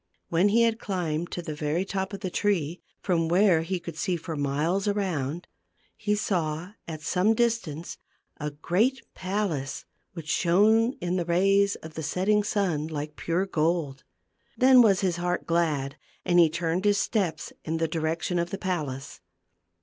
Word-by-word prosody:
When 175 +5 +3
he 230 +3 +4
had 230 0 +1
climbed 175 -5 -2
to 175 - -4
the 155 - -4
very 150 +5 -1
top 190 0 -3
of 200 - -7
the 185 - -3
tree, 175 -6 0 0.2
from 170 -4 +1
where 180 -2 +4
he 180 +3 -2
could 170 -2 -8
see 180 +2 -1
for 165 0 -6
miles 150 +8 0
around, 175 -6 -1 0.5
he 210 -1 0
saw, 175 -4 -2 0.2
at 155 -2 -7
some 190 +7 +2
distance, 220 -10 -1 0.4
a 150 0 -3
great 185 - 0
palace 185 -8 -3 0.3
which 165 -4 -8
shone 215 - +3
in 180 +1 -1
the 175 - -1
rays 195 +4 +3
of 160 0 -9
the 160 - -5
setting 190 +7 +1
sun 180 -8 0
like 150 -1 -5
pure 175 +3 -1
gold. 160 -5 -1 0.5
Then 255 -1 +7
was 200 -4 +4
his 180 -3 0
heart 175 0 -1
glad, 155 -5 0 0.3
and 175 0 +4
he 165 -2 +6
turned 170 +2 -1
his 205 -1 +3
steps 195 -6 -1
in 160 +1 -2
the 165 0 0
direction 165 +2 -1
of 170 0 -1
the 195 - -4
palace. 155 -9 -4
175 Hz, 165 wpm, -27 LUFS, 160-195 Hz, 0.5 s, Then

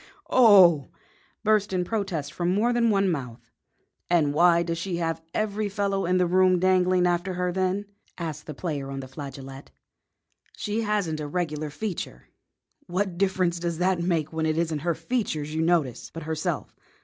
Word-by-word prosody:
Oh!" 190 - +7 0.6
burst 210 -2 +2
in 180 -1 0
protest 175 -9 -3
from 175 +1 0
more 225 +6 +2
than 235 -1 +3
one 200 -2 +2
mouth. 125 -8 -4 0.6
"And 160 -5 +3
why 170 +2 +5
does 165 -1 -3
she 175 0 -3
have 165 -1 -2
every 215 +1 -1
fellow 195 -2 -1
in 180 +1 +2
the 180 - +3
room 185 +1 +4
dangling 185 0 +3
after 175 +1 0
her, 180 0 -1
then?" 190 +2 -1 0.3
asked 155 -3 -5
the 150 - -6
player 145 -6 -4
on 135 0 -5
the 130 - -8
flageolet. 135 -1 -9 0.9
"She 210 +1 -2
hasn't 205 -8 -1
a 150 - -4
regular 155 -2 -2
feature." 160 - -6 0.6
"What 185 0 -2
difference 185 -3 +1
does 170 -1 -2
that 180 0 +1
make 165 -3 -1
when 160 0 0
it 155 0 0
isn't 165 -2 0
her 170 +2 -1
features 160 -5 -2
you 160 - 0
notice, 160 -7 0
but 165 - -7
herself?" 155 0 -3
175 Hz, 170 wpm, -26 LUFS, 155-190 Hz, 0.9 s, Oh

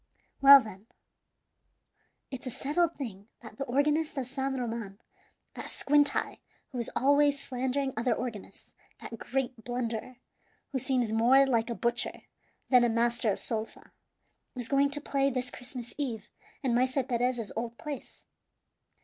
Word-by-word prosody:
"Well, 275 0 +11
then, 215 -3 -9 1.4
it's 260 -1 -6
a - - -1
settled 295 +7 0
thing 205 -7 -7 0.2
that 220 -1 -12
the 275 - -2
organist 295 +4 +1
of 265 - -1
San 265 +1 -3
Roman 225 -5 -4 0.6
that - - -7
squint 290 0 +3
eye, - - -2 0.3
who 255 - -4
is 235 - -3
always 285 +1 +4
slandering 265 +1 -2
other 235 +1 +1
organists 230 -5 -7 0.3
that 230 - -8
great 250 -3 -3
blunderer, 245 0 -3 0.6
who 265 - -1
seems 245 -3 0
more 250 +5 +5
like 235 -3 +1
a 235 - -2
butcher 235 0 -2 0.5
than 250 -2 +7
a 240 - +3
master 235 -1 +1
of - - -3
sol 225 -1 -2
fa - - -19 0.6
is 245 -2 -5
going 280 0 +3
to 290 +1 -3
play 275 -1 +1
this 250 -1 -2
Christmas 245 -1 -7
Eve 235 -6 -3 0.3
in 255 -3 +1
Maese 255 +3 +1
Perez's 245 -2 -1
old 230 +1 -4
place. 290 -4 -8
250 Hz, 150 wpm, -29 LUFS, 235-275 Hz, 1.4 s, Well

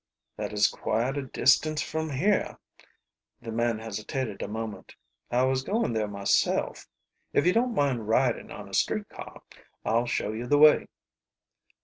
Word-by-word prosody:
"That - - -4
is 105 -1 +4
quite 120 +5 -1
a 140 - -1
distance 155 +4 +3
from 160 0 -3
here." 185 +9 0 0.8
The 115 -1 -7
man 115 0 0
hesitated 110 +1 -4
a - - -3
moment. 110 -2 -6 0.3
"I 125 +1 +2
was 130 0 +1
going 205 - -1
there 110 -1 0
myself. 100 -1 0 0.5
If 145 - +2
you 180 - +4
don't 235 +1 +1
mind 130 -7 0
riding 120 +2 +1
on - - -9
a - - -14
street - - 0
car - - -11 0.4
I'll 115 +2 +1
show 115 -3 -1
you 115 +3 -5
the 145 - +4
way." 150 +1 +6
120 Hz, 155 wpm, -27 LUFS, 110-145 Hz, 0.8 s, way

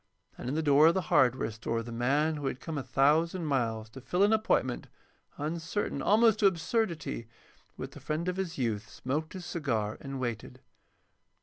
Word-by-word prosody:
And - - -5
in 140 - -1
the 160 - 0
door 145 +1 +6
of 165 - +4
the 185 -5 -2
hardware 125 -3 +3
store 115 +1 -3
the 120 - -8
man 140 +7 +1
who 145 -2 -3
had 130 - -3
come 160 +2 -5
a 145 - -1
thousand 160 +7 +2
miles 115 -6 0
to 135 - -10
fill 180 +9 +1
an 210 +2 +5
appointment, 215 - +1 0.5
uncertain 165 +6 -2
almost 220 +1 +4
to 205 - +6
absurdity, 170 - -1 0.5
with - - -6
the - - -11
friend 155 +3 -3
of 180 0 -1
his 190 -3 -3
youth, 110 -4 -2
smoked 150 +8 -3
his 185 -2 -7
cigar 115 -12 -2
and 135 -1 -5
waited. 120 -4 -4
150 Hz, 185 wpm, -30 LUFS, 125-170 Hz, 0.5 s, door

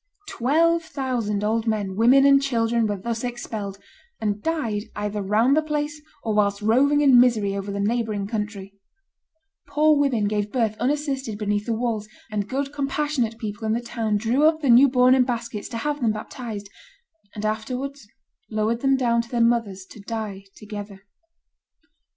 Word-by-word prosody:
Twelve 330 +7 +2
thousand 250 -9 -2
old 225 +2 0
men, 205 -4 -1
women, 250 +6 +5
and 275 0 +6
children 230 -4 +1
were 205 -1 -2
thus 230 +4 -4
expelled, 220 -5 -5 0.4
and 210 -1 -2
died 230 -10 -2
either 210 0 -3
round 220 +7 +3
the 310 - +3
place 300 -1 -3 0.2
or 220 - -1
whilst 200 -1 +2
roving 280 +7 +3
in 270 -4 +7
misery 220 -5 +3
over 200 0 -4
the 200 - -3
neighboring 215 -1 -1
country; 210 -2 -5 0.9
"poor 300 +2 +3
women 265 -8 +1
gave 210 0 -1
birth 225 -4 0
unassisted 270 -3 -1
beneath 205 0 -1
the 230 - 0
walls, 220 -3 -2 0.2
and 205 -1 -2
good 275 +2 -2
compassionate 275 -4 -1
people 215 0 -6
in 220 0 0
the 230 - 0
town 225 -3 -2
drew 235 +7 +1
up 315 0 +1
the 275 -5 +3
new 260 +4 +7
born 250 0 +5
in 260 -1 +5
baskets 235 -4 -4
to 230 - -5
have 295 +4 -2
them 230 -3 +2
baptized, 215 -1 -7 0.7
and 210 0 -4
afterwards 250 +4 -4 0.4
lowered 220 +1 0
them 270 -1 +3
down 235 -2 +2
to 235 - -12
their 240 - -2
mothers 230 -5 +1
to 210 - -14
die 205 -2 -5
together." 205 -2 -8
230 Hz, 170 wpm, -23 LUFS, 210-270 Hz, 0.9 s, in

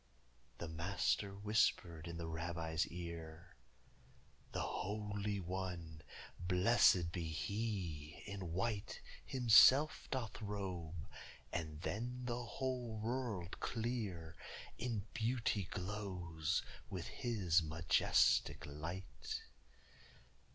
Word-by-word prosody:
The 85 - -4
Master 95 +4 0
whispered 95 -5 +1
in 85 0 -5
the 85 - -3
Rabbi's 80 0 -1
ear: 85 0 -7 1.0
"The - - -1
Holy 105 0 -2
One, 90 -3 -4 0.5
blessëd 90 -2 +5
be 85 -1 -2
He, 80 -2 -3
in 100 -4 -5
white 100 +3 -1 0.2
Himself 130 +4 +7
doth 120 -4 -3
robe, 90 -6 -4 0.5
and 80 -1 -3
then 125 +6 -2
the 120 0 -2
whole 125 -1 -2
world 110 -5 -2
clear 105 -9 -2 0.4
In 110 -3 -1
beauty 115 -4 +1
glows 90 -4 -2 0.3
with 90 -4 -4
His 100 -9 +2
majestic 80 +1 +3
light." 75 -2 -5
95 Hz, 90 wpm, -38 LUFS, 85-110 Hz, 1.0 s, Himself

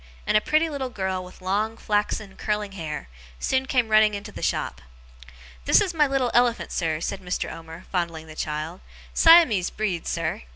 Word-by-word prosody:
and - - +1
a 215 - +5
pretty 310 +6 +2
little 280 -4 -4
girl 190 -5 -3
with 180 +1 -14
long, 210 +4 0
flaxen, 210 -2 -1
curling 210 -1 -2
hair, 160 - -6 0.3
soon 260 - 0
came 250 -5 +1
running 215 -1 +5
into 200 0 -7
the - - -9
shop. - - -1 0.8
'This - - +6
is 370 -3 0
my 300 -3 +3
little 270 -3 0
elephant, 240 -1 +2
sir,' 160 -3 -1
said 195 +4 -3
Mr. 180 -1 -3
Omer, 165 +1 -10
fondling 170 -3 -2
the 155 - -11
child. 155 +3 -4 0.3
'Siamese 325 - +6
breed, 200 -6 -3
sir. - - -2
205 Hz, 175 wpm, -25 LUFS, 175-245 Hz, 0.8 s, This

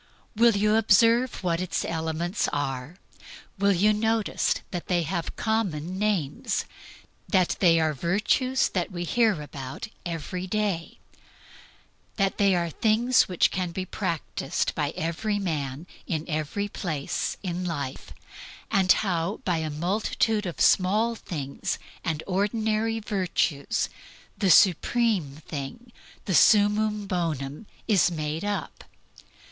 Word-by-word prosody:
Will 230 -1 +5
you 210 +2 +3
observe 230 +3 +4
what 170 -1 0
its 185 - -2
elements 165 +3 -1
are? 140 +1 -3 0.6
Will 200 0 +4
you 200 +3 +4
notice 220 0 +1 0.2
that 175 -2 -5
they 175 -2 +1
have 170 +1 -3
common 185 -6 -1
names; 195 -9 -1 0.6
that 185 -4 +2
they 165 -3 +5
are 160 -1 +1
virtues 210 - +1
which 180 -3 -1
we 175 -3 -4
hear 220 0 +2
about 135 - -7
every 175 +2 -4
day; 200 -4 -2 1.2
that 195 -2 0
they 200 -2 +4
are 170 -1 -1
things 225 - +3
which 180 - +3
can 180 -1 -2
be 185 +2 -4
practised 160 -5 -2
by 145 -2 -1
every 175 +6 -1
man 150 -6 -3 0.2
in 160 -1 -2
every 155 +6 -2
place 155 -8 -3
in 180 -1 -3
life; 145 -7 -4 0.6
and 190 -1 +4
how, 180 0 +1
by 180 -3 +1
a 160 -1 -2
multitude 205 +6 0
of 175 - -6
small 210 +5 +3
things 150 -11 -4 0.3
and 160 -2 -2
ordinary 215 +3 0
virtues, 185 -8 -1 0.5
the 195 - +1
supreme 185 - +3
thing, 155 - -6 0.3
the 190 - -1
summum 210 +2 +4
bonum, 165 -3 -3 0.2
is 195 -6 +4
made 155 0 -3
up? 205 -7 -4
185 Hz, 125 wpm, -26 LUFS, 160-210 Hz, 1.2 s, Will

